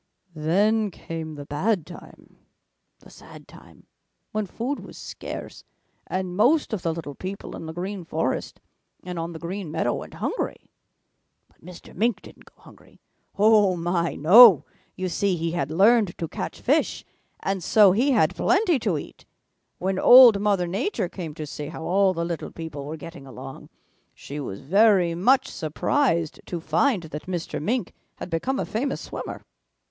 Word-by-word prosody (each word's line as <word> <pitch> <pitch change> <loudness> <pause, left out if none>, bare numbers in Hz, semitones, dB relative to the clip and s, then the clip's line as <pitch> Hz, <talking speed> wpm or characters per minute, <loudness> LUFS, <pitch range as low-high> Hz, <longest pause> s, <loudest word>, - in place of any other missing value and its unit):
"Then 205 +8 +1
came 165 -3 -7
the 145 -1 -8
bad 170 +5 -1
time, 175 - -14 0.6
the - - -17
sad - - -14
time, - - -17 0.5
when 215 -1 -2
food 250 +9 -4
was - - -12
scarce, - - -8 0.4
and 185 -1 -3
most 255 - +3
of 205 - -2
the 165 - -1
little 160 -3 -6
people 190 +6 -7
in 165 - -8
the - - -5
Green 185 +3 -5
Forest 160 -4 -3 0.4
and 180 -2 -5
on 165 +1 -4
the - - -7
Green 175 +2 -5
Meadow 155 - -1
went - - -7
hungry. - - -4 0.8
But - - -32
Mr. 180 0 -12
Mink 230 +5 0
didn't - - -15
go - - -23
hungry. - - -19 0.4
Oh, 205 -2 +5
my, 170 0 -1
no! 195 - +8 0.3
You 185 0 -3
see, 190 +1 0
he 165 0 -2
had 145 -5 -2
learned 200 +3 +3
to 165 - -3
catch - - -6
fish, - - 0 0.4
and 195 -2 -2
so 205 +1 +6
he 240 +9 +2
had 215 - +2
plenty 365 -6 +2
to 205 -8 0
eat. - - -10 0.5
When 190 +1 -1
Old 245 -5 +8
Mother 200 -4 +1
Nature 200 - -2
came 165 -6 -7
to 155 - -5
see 145 0 -7
how 160 +1 -8
all 190 +2 +2
the 170 0 -2
little 170 -1 -4
people 160 -4 -7
were 155 +2 -6
getting 155 -2 -10
along, 130 - -10 0.5
she 145 +2 -8
was 100 -8 -6
very 190 +2 +4
much 245 +11 +3
surprised 165 - -1
to 175 - -4
find 175 - +1
that 155 +1 -8
Mr. 175 -5 -4
Mink 230 +4 -2 0.2
had 180 - -8
become 260 +12 -1
a - - -1
famous 265 +5 -2
swimmer. - - -7
180 Hz, 165 wpm, -24 LUFS, 165-210 Hz, 0.8 s, no